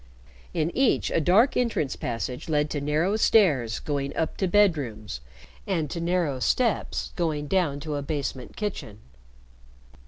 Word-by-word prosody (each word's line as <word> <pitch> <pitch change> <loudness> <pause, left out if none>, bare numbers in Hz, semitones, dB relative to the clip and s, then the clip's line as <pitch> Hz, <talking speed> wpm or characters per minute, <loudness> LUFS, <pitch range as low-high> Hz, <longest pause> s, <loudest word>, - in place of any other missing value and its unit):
In 155 - -1
each 265 -2 +2
a 165 - +2
dark 205 - +4
entrance 225 - 0
passage 125 +4 -4
led 150 -1 +1
to 145 - -2
narrow 155 +8 +1
stairs 150 - +3
going 140 -2 -3
up 160 - -1
to 190 - 0
bedrooms, 140 - +1 0.5
and 165 -7 -1
to 170 - -3
narrow 170 -6 0
steps 235 - 0
going 155 -4 -1
down 150 -4 0
to 155 0 -4
a 145 - -2
basement 140 -3 -4
kitchen. 200 - -4
155 Hz, 145 wpm, -26 LUFS, 140-185 Hz, 0.5 s, dark